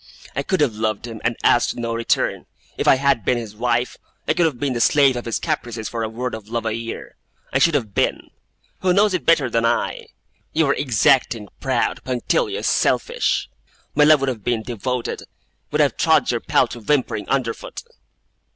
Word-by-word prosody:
'I - - 0
could 190 -5 -1
have 135 -6 +2
loved 110 0 -2
him, 115 -2 -8
and 120 0 0
asked 120 - +3
no 115 -1 -3
return. 115 0 -1 0.3
If - - -2
I - - +7
had 135 -4 +1
been 125 - +1
his 110 -3 -7
wife, 120 +2 -1 0.3
I - - +3
could 170 - +3
have 135 -7 -5
been 140 -1 -1
the 120 - -2
slave 140 -1 +4
of 120 - -5
his 115 - -1
caprices 115 -2 -3
for 115 - -4
a 110 - -2
word 125 +2 -4
of 110 -1 -8
love 115 0 -3
a 110 - 0
year. 115 +1 -7 0.4
I 135 - +3
should 160 +2 +4
have 110 -8 -1
been. - - -1 0.5
Who 185 -1 +2
knows 205 +1 +3
it 185 - -2
better 160 -5 +4
than 115 -1 0
I? 115 0 -1 0.5
You 160 0 +3
were 140 - +2
exacting, 120 -4 +2
proud, 130 -3 -1
punctilious, 405 - -1
selfish. 485 +1 +1 0.5
My 150 - +4
love 150 -1 +6
would 135 - +1
have 115 -6 -5
been 115 -1 -1
devoted 120 +1 -3 0.5
would - - +1
have - - +2
trod - - +3
your - - -1
paltry 120 - 0
whimpering 125 -3 -1
under 130 -4 +1
foot! - - -9
120 Hz, 195 wpm, -21 LUFS, 115-140 Hz, 0.5 s, I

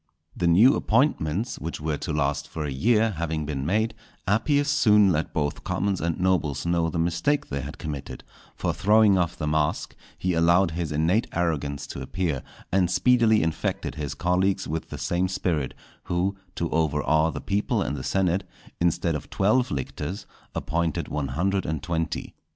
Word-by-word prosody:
The 85 - 0
new 105 +11 +6
appointments, 110 - +1
which 85 +2 -5
were 75 -1 -2
to 85 - -4
last 75 -1 0
for 80 -2 -5
a 70 - -3
year, 110 - +2
having 80 -2 -2
been 70 -2 -3
made, 110 +5 +1 0.3
Appius 140 +8 +2
soon 105 -9 +5
let 75 -1 -1
both 75 -2 -2
commons 95 +1 -1
and 85 -1 -1
nobles 85 -7 +1
know 85 -1 +1
the 85 - -4
mistake 85 - 0
they 70 0 -2
had 70 +4 -7
committed, 75 -4 -6 0.3
for - - -1
throwing 105 0 +4
off 85 0 -1
the 75 - -3
mask, 75 -1 0 0.2
he 90 -1 -1
allowed 85 +2 +4
his 80 -1 -3
innate 80 +9 +2
arrogance 75 -5 -1
to 70 - -7
appear, 80 0 -2 0.3
and 95 -2 +3
speedily 115 +1 +4
infected 80 -1 -2
his 75 -3 -4
colleagues 95 +2 +1
with 80 +1 -4
the 75 - -6
same 85 +7 0
spirit; 80 -7 -1 0.3
who, 90 +3 0 0.2
to 85 - -1
overawe 80 0 +2
the - - -5
people 100 +2 0
and - - -2
the 65 - -5
senate, 95 +2 +1 0.4
instead 85 0 +1
of 75 - -5
twelve 110 +6 +2
lictors, 75 +7 -4 0.3
appointed 85 -1 -1
one 75 -2 -2
hundred 95 +8 0
and 80 -2 -3
twenty. 80 -2 -3
85 Hz, 170 wpm, -25 LUFS, 75-95 Hz, 0.4 s, new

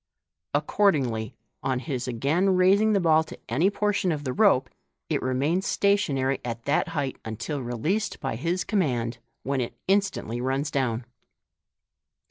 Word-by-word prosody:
Accordingly, 140 - +1 0.3
on 130 -1 0
his 130 -2 -3
again 150 +11 +1
raising 200 +4 +4
the 200 - +3
ball 160 -3 +4
to - - -10
any 155 +12 +2
portion 205 -3 0
of 150 -2 -3
the 130 -3 -2
rope, 135 -11 +4 0.4
it - - 0
remains 145 +9 0
stationary 145 -10 +1
at 115 -1 -5
that 140 - +1
height 145 -6 -2
until 120 +6 -4
released 130 - -2
by 135 -5 -3
his 170 +9 -1
command, 125 - 0 0.2
when 135 0 0
it 120 - -4
instantly 195 - 0
runs 135 +4 -1
down. 125 -4 -1
140 Hz, 140 wpm, -26 LUFS, 125-185 Hz, 0.4 s, raising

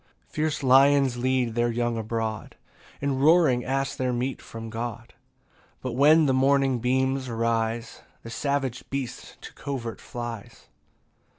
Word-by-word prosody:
16 - - -31
Fierce 155 -1 -1
lions 135 0 +5
lead 125 -1 0
their 120 +1 +1
young 120 0 -1
abroad, 110 -1 -4 0.5
And 135 -1 0
roaring 150 -5 +4
ask 135 +1 -2
their 130 -1 0
meat 125 +2 -2
from 115 0 -8
God; 115 0 -6 0.7
But 130 - -4
when 150 +6 +5
the 135 - +2
morning 135 -1 +3
beams 130 +2 0
arise, 115 0 -1 0.2
The 115 - -8
savage 135 -2 -2
beast 135 -3 -6
to - - -10
covert 125 -5 -5
flies. 120 -3 -8
125 Hz, 135 wpm, -26 LUFS, 115-135 Hz, 0.7 s, lions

